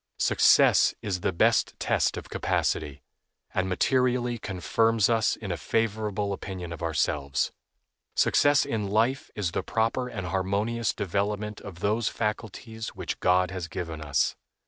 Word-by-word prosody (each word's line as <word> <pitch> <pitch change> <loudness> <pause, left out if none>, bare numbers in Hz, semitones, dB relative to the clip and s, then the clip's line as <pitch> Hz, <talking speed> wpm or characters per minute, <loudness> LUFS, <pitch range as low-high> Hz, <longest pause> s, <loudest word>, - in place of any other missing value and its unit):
Success - - +5
is 95 -3 -2
the - - +1
best 85 - +2
test - - +1
of - - -7
capacity, 75 -2 -1 0.5
and 95 0 0
materially 125 +3 +1
confirms 110 +4 +1
us 115 -1 +2
in 100 -4 -6
a 85 - -2
favorable 105 +1 -1
opinion 90 -3 -6
of 85 - -9
ourselves. 75 -4 0 0.6
Success 145 -1 +4
in 105 -3 -2
life 115 +6 +1
is 95 -5 -1
the - - -1
proper 115 +3 0
and 95 -6 -5
harmonious 100 +5 0
development 105 +2 -2
of 90 -3 -10
those 105 +2 +1
faculties 110 +1 -4
which - - -4
God 90 +1 +3
has 90 -2 -4
given 80 -2 -5
us. 70 -3 +1
100 Hz, 140 wpm, -27 LUFS, 90-115 Hz, 0.6 s, Success